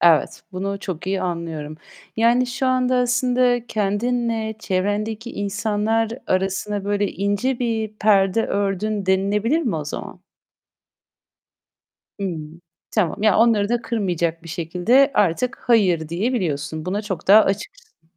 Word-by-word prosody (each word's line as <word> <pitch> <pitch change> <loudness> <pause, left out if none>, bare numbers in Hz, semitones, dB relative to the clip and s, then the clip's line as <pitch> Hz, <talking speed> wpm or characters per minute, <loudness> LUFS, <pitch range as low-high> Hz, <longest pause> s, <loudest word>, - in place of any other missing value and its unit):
Evet, 165 -3 +3
bunu 195 +2 -3
çok 180 -4 -5
iyi 195 0 -1
anlıyorum. 165 -4 -4 0.4
Yani 235 +3 +3
şu 255 +2 -2
anda 255 0 +2
aslında 245 -1 +2
kendinle 220 +2 -1
çevrendeki 210 +4 -2
insanlar 210 +2 -1 0.2
arasına, 195 +2 -1
böyle, 205 0 0
ince 205 +6 -1
bir 225 -3 -1
perde 205 0 +3
ördün 200 +1 -1
denilebilir 205 +8 +2
mi 235 - -1
o 150 - -4
zaman? 145 - -7 2.0
Hımm, 165 -3 -5 0.3
tamam. 200 -3 0
Yani 215 -3 +4
onları 220 -3 +4
da 240 +1 0
kırmayacak 175 -8 -1
bir 165 - -11
şekilde 180 - +2
artık, 205 +6 +1
"Hayır." 185 -9 +2
diyebiliyorsun. 165 - -2
Buna 200 +4 -2
çok 190 -5 -5
daha 210 +3 +9
açıksın. 440 - -5
205 Hz, 120 wpm, -22 LUFS, 185-230 Hz, 2.0 s, daha